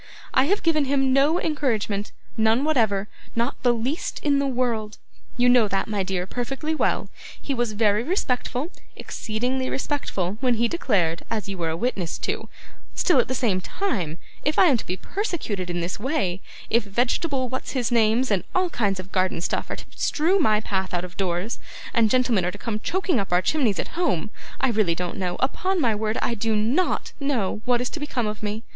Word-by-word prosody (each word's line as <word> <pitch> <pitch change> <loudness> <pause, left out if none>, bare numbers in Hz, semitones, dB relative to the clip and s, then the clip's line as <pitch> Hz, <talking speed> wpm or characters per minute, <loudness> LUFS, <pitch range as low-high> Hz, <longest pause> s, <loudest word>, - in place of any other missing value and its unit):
I 260 - +5
have 400 +7 +1
given 310 -3 +3
him 270 -1 +2
no 290 +6 +4
encouragement 220 -9 -1 0.2
none 220 +3 +3
whatever 220 -10 +2 0.3
not 235 +4 -1
the 245 - +4
least 240 +7 -2
in 285 -2 +3
the 280 - +1
world. 235 -5 -1 0.4
You 245 0 +4
know 245 -3 +6
that, 195 -1 -1
my 210 -2 -1
dear, 185 -1 -1
perfectly 270 +9 -3
well. 315 - 0 0.3
He 280 - -3
was 240 -4 0
very 210 0 +3
respectful, 265 - -1 0.2
exceedingly 250 +4 -2
respectful, 210 - -2
when 250 -2 +3
he 235 +1 +2
declared, 195 - +1
as 220 -3 -2
you 195 - -4
were 165 -1 0
a 160 - -2
witness 195 -7 -1
to; - - -3 0.5
still 350 -8 +4
at - - +3
the 260 - -2
same 210 -7 +1
time, 185 - -2 0.3
if 300 +1 0
I - - +7
am 255 - +4
to - - -8
be 185 - -2
persecuted 230 - -3
in 175 0 -1
this 175 +3 -3
way, 205 - -1 0.3
if 235 0 +4
vegetable 255 - 0
what's 260 +1 -4
his 250 -3 0
names 230 +1 +3
and 195 -3 +2
all 370 -1 +2
kinds 200 -4 0
of 185 +1 -8
garden 185 -2 +1
stuff 170 - -2
are - - -2
to - - -10
strew 345 +6 +2
my 215 -9 +3
path 190 -3 -2
out 175 +1 -1
of 180 0 -11
doors, 185 +4 -1 0.3
and 225 -2 +4
gentlemen 245 -5 +3
are 180 - 0
to 205 - -9
come 215 0 -3
choking 365 - 0
up 195 - -3
our 180 +1 +3
chimneys 250 - +2
at - - -2
home, 275 - 0 0.3
I 265 - +2
really 210 -7 +2
don't 180 0 -3
know 180 -2 -1
upon 370 +8 +1
my 240 -7 +3
word 215 +1 -1
I - - +1
do 225 0 0
NOT 245 +13 +1
know 245 -8 0
what 245 -1 +3
is 250 - -1
to - - -5
become 265 -5 -2
of 210 0 -4
me. 215 +1 -3
230 Hz, 200 wpm, -24 LUFS, 200-270 Hz, 0.5 s, I